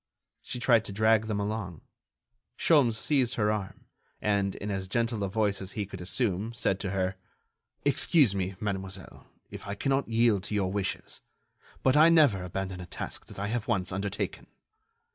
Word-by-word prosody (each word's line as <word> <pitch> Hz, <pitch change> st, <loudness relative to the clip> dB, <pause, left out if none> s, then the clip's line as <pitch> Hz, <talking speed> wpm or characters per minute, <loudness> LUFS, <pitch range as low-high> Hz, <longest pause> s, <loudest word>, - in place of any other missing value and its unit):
She 125 Hz, -, -6 dB
tried 120 Hz, -3 st, +4 dB
to -, -, -4 dB
drag 110 Hz, +1 st, +3 dB
them 105 Hz, -2 st, -1 dB
along. 100 Hz, -5 st, -3 dB, 0.8 s
Sholmes 140 Hz, -9 st, +4 dB
seized 130 Hz, -2 st, +1 dB
her 105 Hz, -1 st, +2 dB
arm, 105 Hz, -3 st, -5 dB, 0.3 s
and 100 Hz, -2 st, 0 dB
in 105 Hz, +1 st, -5 dB
as 95 Hz, -1 st, -3 dB
gentle 115 Hz, +1 st, 0 dB
a 100 Hz, -, -1 dB
voice 105 Hz, -1 st, 0 dB
as 95 Hz, 0 st, -6 dB
he 105 Hz, -2 st, -2 dB
could 95 Hz, -2 st, -9 dB
assume, 100 Hz, +3 st, -1 dB
said 100 Hz, -4 st, 0 dB
to 100 Hz, -, -3 dB
her: 95 Hz, 0 st, -1 dB, 0.7 s
"Excuse 145 Hz, -, +4 dB
me, 95 Hz, -1 st, -2 dB
mademoiselle, 95 Hz, -2 st, -5 dB, 0.2 s
if -, -, -8 dB
I 100 Hz, -, -3 dB
cannot 135 Hz, +4 st, 0 dB
yield 115 Hz, -3 st, +3 dB
to 105 Hz, -, -3 dB
your 95 Hz, -2 st, 0 dB
wishes, 100 Hz, -1 st, -3 dB, 0.6 s
but 130 Hz, +1 st, +4 dB
I 155 Hz, +2 st, +7 dB
never 145 Hz, -, +5 dB
abandon 95 Hz, +1 st, -4 dB
a 90 Hz, -, -9 dB
task -, -, -6 dB
that -, -, -12 dB
I 100 Hz, +1 st, -2 dB
have 115 Hz, -1 st, -2 dB
once 100 Hz, -6 st, 0 dB
undertaken." 95 Hz, +1 st, -3 dB
105 Hz, 175 wpm, -29 LUFS, 95-115 Hz, 0.8 s, I